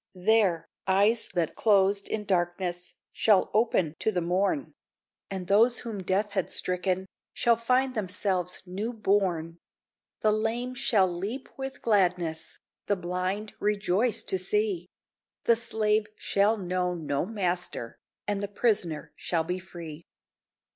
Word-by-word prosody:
There, 185 -3 +2 0.2
eyes 205 +4 +3
that 170 -3 0
closed 200 -2 +3
in 210 -1 -2
darkness 175 -1 -1 0.2
Shall 210 -4 +3
open 210 -8 +2
to 220 - +1
the 185 - 0
morn; 190 - 0 0.6
And 190 -2 -4
those 225 +6 +4
whom 220 -5 -5
death 195 +3 0
had 190 -3 -1
stricken, 185 +1 -1 0.3
Shall 235 -1 +4
find 255 +3 +1
themselves 185 -3 -1
new 200 +6 -4
born; 185 -6 0 0.6
The 215 - +4
lame 225 +4 -1
shall 220 -7 +3
leap 200 +9 -4
with 270 0 -6
gladness, 180 -7 +1 0.3
The 205 - +2
blind 185 +4 -3
rejoice 210 +2 +1
to 190 - +2
see; 195 -2 0 0.6
The 235 - +5
slave 215 -2 +1
shall 205 +3 +2
know 180 -2 -1
no 155 -1 -2
master, 180 - -3 0.3
And 205 -1 -1
the 200 - -2
prisoner 200 -7 -1
shall 165 -2 0
be 180 +3 -3
free. 170 -4 -9
195 Hz, 130 wpm, -28 LUFS, 180-215 Hz, 0.6 s, The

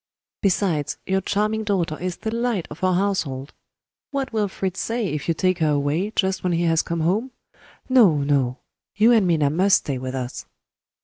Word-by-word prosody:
Besides, 175 -7 0
your 190 0 +1
charming 215 +3 0
daughter 185 -7 0
is 180 0 -3
the 220 - -4
light 235 -6 -1
of 150 - -10
our 185 -1 +3
household. 165 -9 -1 0.6
What 275 -3 -3
will 215 -2 +1
Fritz 190 -1 -4
say, 230 0 -1
if 150 -1 -4
you 165 - +1
take 185 +1 +1
her 155 -2 +2
away 150 +7 0
just 190 -1 0
when 180 -1 +1
he 170 +1 +1
has 165 -1 +3
come 170 -1 -3
home? 200 +10 +1 0.6
No! 230 - +5
no! 135 -3 +1 0.4
you 220 +3 +5
and 220 -6 +4
Minna 155 -5 +2
must 190 +5 +4
stay 135 -3 -4
with 130 +1 -5
us." 125 -1 -5
185 Hz, 185 wpm, -23 LUFS, 150-205 Hz, 0.6 s, No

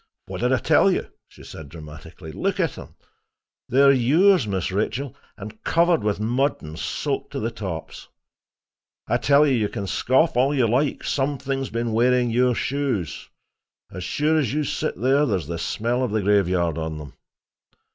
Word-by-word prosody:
"What - - -7
did - - +1
I - - +4
tell - - +3
you?" - - 0 0.2
she - - -16
said 80 -3 -10
dramatically. 80 +2 -11
"Look - - -2
at - - 0
'em. - - -11 0.7
They're 140 +2 +5
yours, 145 - +4
Miss 95 -2 -2
Rachel—and 110 -1 -5
covered 170 0 +2
with 105 -1 -1
mud 125 +6 0
and 80 +1 -8
soaked - - -3
to - - -3
the 115 +2 -2
tops. 95 -8 -7 1.0
I - - +2
tell 145 +1 +4
you, 140 - +2
you 110 -4 +1
can 100 - -5
scoff 130 - +1
all 135 +4 +2
you 125 -4 +3
like; 135 +6 0
something 135 -1 -1
has 135 - -4
been 115 0 -2
wearing 120 +1 +2
your 125 +1 +2
shoes. 130 - -2 0.6
As 90 - -7
sure 155 - +1
as 130 -7 -1
you 150 +1 0
sit 130 - -3
there, 135 +5 +3
there's 95 -8 -1
the 85 +2 -5
smell 120 +8 -1
of 125 - -1
the 105 0 -1
graveyard 90 -5 +1
on 80 -1 -4
them. 75 -2 -10
115 Hz, 175 wpm, -23 LUFS, 95-140 Hz, 1.0 s, They're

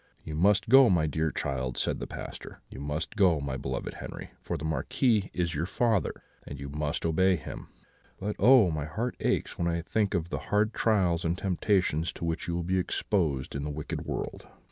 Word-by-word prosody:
"'You 75 - -6
must 95 +6 +3
go, 135 +1 +8
my 85 -4 +3
dear 80 +1 0
child,' 65 -4 -3
said - - 0
the - - -5
Pastor; - - -8
'you - - -8
must 75 +7 -3
go, 95 -7 +4
my 70 -2 -3
beloved - - -4
Henri, - - -8
for - - -3
the 75 - -6
Marquis 95 - +1
is 85 -2 -1
your 80 +4 -1
father, 110 -2 0 0.2
and 70 - -9
you 70 0 -6
must 75 +2 -2
obey 95 +3 +3
him; 80 - -8 0.5
but 105 +2 -3
oh! 120 -8 +7
my 75 -2 -2
heart 115 +11 -3
aches - - -1
when 85 - +1
I 85 -1 -1
think 105 +3 0
of 85 -1 -1
the - - -3
hard 105 +2 +2
trials 90 -7 +2
and 85 +1 0
temptations 90 -4 +1
to - - -5
which 85 +2 -2
you 85 - -1
will 85 - -1
be 95 +2 +1
exposed 80 -8 0
in 70 - -3
the 75 - -3
wicked 75 +1 -4
world.' - - -5
85 Hz, 205 wpm, -29 LUFS, 75-100 Hz, 0.5 s, go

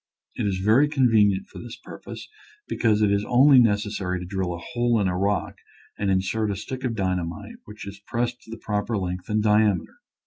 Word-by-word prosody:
It - - -2
is 95 -2 -1
very 110 +10 +4
convenient 110 -9 +3
for - - -11
this 120 -1 -8
purpose, - - -10 0.4
because 110 -2 +1
it 105 - +3
is 100 0 +1
only 130 +2 +6
necessary 105 -5 0
to 90 - -7
drill 95 -1 -3
a - - -7
hole 120 +6 0
in 100 - +1
a 90 - -1
rock 100 +2 -1 0.4
and 100 - -2
insert 95 +3 0
a 100 - -1
stick 130 +6 -7
of 120 -3 -1
dyna 95 -3 0
mite 85 -1 -8
which 105 -1 -10
is 100 0 -9
pressed 120 +1 -1
into - - -20
the - - -24
proper 105 +1 -1
length 90 -1 -4
and 105 0 +1
diameter. 105 -4 +2
105 Hz, 205 wpm, -24 LUFS, 95-115 Hz, 0.4 s, only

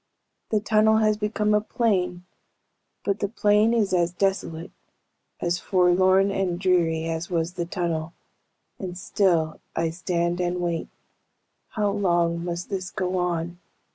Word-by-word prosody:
The 215 - +2
tunnel 215 +1 +3
has 215 -1 +3
become 210 0 0
a 210 - +3
plain, 185 -6 -1 0.8
but 200 0 -1
the 205 - 0
plain 210 +1 +3
is 215 -5 +1
as 175 -1 +2
desolate, 180 -3 -2 0.7
as 175 0 0
forlorn 185 +1 +3
and 185 -3 -1
dreary 170 -4 +2
as 165 +1 -3
was 170 -1 -1
the 175 -2 -3
tunnel, 170 -2 -2 0.7
and 180 -2 -5
still 170 -4 +1 0.2
I 165 0 0
stand 170 +1 -1
and 180 0 -1
wait. 170 -2 -2 0.9
How 210 -2 +1
long 170 -4 +1
must 175 +1 -4
this 185 -2 -3
go 185 -1 -2
on?" 175 -1 -2
180 Hz, 140 wpm, -25 LUFS, 170-200 Hz, 0.9 s, tunnel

